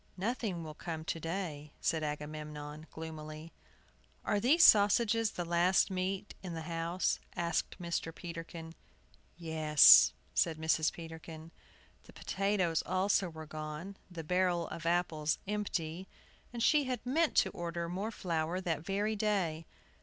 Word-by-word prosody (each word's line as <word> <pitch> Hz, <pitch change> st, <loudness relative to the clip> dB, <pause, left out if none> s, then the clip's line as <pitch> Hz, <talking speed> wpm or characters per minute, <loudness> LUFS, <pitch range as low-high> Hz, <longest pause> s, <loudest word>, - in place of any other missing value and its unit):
"Nothing 200 Hz, -4 st, -2 dB
will 155 Hz, -1 st, -7 dB
come 160 Hz, 0 st, -6 dB
to 165 Hz, -, -3 dB
day," 165 Hz, -3 st, -5 dB
said 160 Hz, -1 st, 0 dB
Agamemnon, 150 Hz, 0 st, -6 dB
gloomily. 155 Hz, 0 st, -8 dB, 0.7 s
"Are 205 Hz, -, +1 dB
these 295 Hz, +10 st, +5 dB
sausages 220 Hz, +2 st, +5 dB
the 175 Hz, -, -3 dB
last 175 Hz, +3 st, +3 dB
meat 190 Hz, +2 st, -3 dB
in 180 Hz, -3 st, -6 dB
the 160 Hz, -, -5 dB
house?" 170 Hz, +2 st, -1 dB, 0.2 s
asked 170 Hz, +1 st, -2 dB
Mr. 170 Hz, -2 st, -3 dB
Peterkin. 165 Hz, -1 st, -8 dB, 0.6 s
"Yes," 155 Hz, -3 st, +7 dB, 0.2 s
said 160 Hz, -2 st, +1 dB
Mrs. 160 Hz, 0 st, +2 dB
Peterkin. 160 Hz, -1 st, -10 dB, 0.5 s
The -, -, -15 dB
potatoes 190 Hz, -4 st, 0 dB
also 190 Hz, 0 st, +1 dB
were 160 Hz, -1 st, -9 dB
gone, 155 Hz, +5 st, -6 dB
the 170 Hz, -3 st, -7 dB
barrel 180 Hz, 0 st, +1 dB
of 165 Hz, 0 st, -5 dB
apples 165 Hz, -3 st, +1 dB
empty, 190 Hz, -4 st, -3 dB, 0.4 s
and 235 Hz, -1 st, -3 dB
she 295 Hz, +1 st, +4 dB
had 255 Hz, -2 st, -3 dB
meant 310 Hz, +5 st, +1 dB
to -, -, +4 dB
order 170 Hz, 0 st, -4 dB
more 190 Hz, +5 st, -3 dB
flour 170 Hz, -4 st, -2 dB
that 165 Hz, -5 st, -2 dB
very 205 Hz, +4 st, -1 dB
day. 185 Hz, -7 st, -1 dB
170 Hz, 135 wpm, -33 LUFS, 160-195 Hz, 0.7 s, Yes